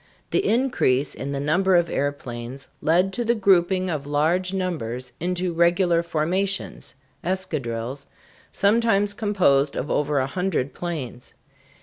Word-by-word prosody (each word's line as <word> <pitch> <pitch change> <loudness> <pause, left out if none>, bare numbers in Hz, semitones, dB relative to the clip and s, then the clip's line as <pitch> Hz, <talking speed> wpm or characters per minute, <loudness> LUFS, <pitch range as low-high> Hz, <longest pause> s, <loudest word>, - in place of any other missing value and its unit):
The 390 - +2
increase 220 - +1
in 140 - -5
the 140 - -2
number 180 +6 +2
of 175 -1 +4
airplanes 135 -3 -4
led 180 +4 +2
to 240 - -1
the 235 +1 +2
grouping 185 -2 +3
of 150 -5 -3
large 165 +6 +1
numbers 130 -10 -3
into 180 +1 -1
regular 170 0 +3
formations 175 +4 -2 0.3
(escadrilles), 140 -8 -3 0.4
sometimes 205 -1 +3
composed 185 - +2
of 140 - -3
over 150 0 +1
a 130 - +2
hundred 150 -3 -2
planes. 145 -8 -6
170 Hz, 125 wpm, -24 LUFS, 140-190 Hz, 0.4 s, of